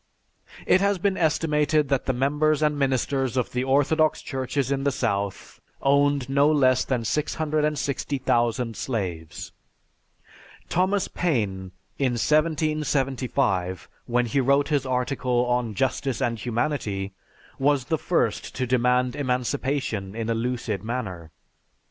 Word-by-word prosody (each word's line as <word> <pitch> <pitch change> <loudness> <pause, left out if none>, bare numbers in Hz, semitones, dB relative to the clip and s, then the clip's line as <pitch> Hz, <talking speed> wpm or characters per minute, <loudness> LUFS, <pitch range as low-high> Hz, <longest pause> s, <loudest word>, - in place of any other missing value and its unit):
It 185 - +4
has 200 0 +2
been 195 +2 0
estimated 155 -3 +1
that 135 -2 0
the - - +3
members 150 +4 +1
and 150 -1 +2
ministers 135 -1 0
of 125 - 0
the 125 0 -1
Orthodox 145 +4 +2
churches 135 0 -2
in 135 0 0
the 140 - +2
South 100 -6 -3 0.2
owned 140 -1 +2
no 140 +2 +3
less 130 -4 +3
than 125 -4 -2
660,000 140 -5 0
slaves. 90 - -4 1.2
Thomas 185 +3 +1
Paine, 100 - -1 0.3
in 130 -3 +1
1775, 135 - 0 0.2
when 120 0 +1
he 120 +4 0
wrote 140 +3 +2
his 140 -3 0
article 125 -1 0
on 125 -3 -1
"Justice 130 +2 -1
and 115 -2 -1
Humanity," 110 -5 -2 0.5
was 140 -1 +2
the 160 0 -1
first - - -1
to 130 - -1
demand 125 0 +2
emancipation 125 -5 -2
in 115 0 -2
a - - +2
lucid 115 -4 -2
manner. 105 -9 -4
130 Hz, 125 wpm, -25 LUFS, 120-145 Hz, 1.2 s, It